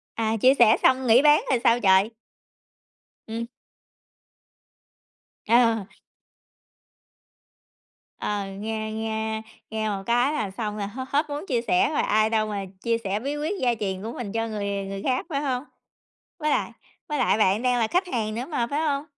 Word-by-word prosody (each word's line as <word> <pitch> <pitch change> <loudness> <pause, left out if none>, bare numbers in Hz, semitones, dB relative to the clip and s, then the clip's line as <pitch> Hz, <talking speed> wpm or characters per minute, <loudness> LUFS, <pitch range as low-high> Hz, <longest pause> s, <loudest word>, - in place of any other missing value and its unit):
À, 225 0 0
chia 255 +5 +5
sẻ 230 -4 +6
xong 260 0 +3
nghỉ 235 +3 +6
bán 300 0 +6
rồi 255 -3 +2
sao 235 0 +4
trời? 195 +1 +4 1.2
Ừm. 230 +1 -4 2.0
Ờ. 230 -2 +4 2.3
Ờ, 205 -1 -2
nghe 215 +2 -4
nghe 220 0 -3 0.3
nghe 220 0 -2
một 195 -1 -3
cái 245 +5 +2
là 215 -10 -2
xong 210 +1 -4
là 205 - -3
h 225 +6 -8
hết 295 +3 0
muốn 290 +4 -4
chia 245 -4 +1
sẻ 360 - +2
rồi 305 - 0
ai 215 +1 +2
đâu 220 -1 +1
mà 205 -2 -3 0.2
chia 230 0 +1
sẻ 200 +2 -1
bí 280 +4 -3
quyết 315 +7 -3
gia 245 -2 +2
truyền 190 -2 -3
của 225 +2 -5
mình 220 -5 -6
cho 225 0 -1
người 210 -2 -3 0.2
người 195 0 -6
khác, 255 +4 0
phải 280 -3 -1
hông? 260 -2 -2 0.7
Với 305 -1 0
lại - - 0 0.4
với 300 -1 -2
lại 245 -4 +2
bạn 205 +2 +3
đang 250 -1 +2
là 225 - +2
khách 360 +1 0
hàng 215 -7 -2
nữa 245 +3 -4
mà, 240 -7 -1
phải 290 - 0
hông? 290 -2 0
230 Hz, 175 wpm, -25 LUFS, 215-265 Hz, 2.3 s, sẻ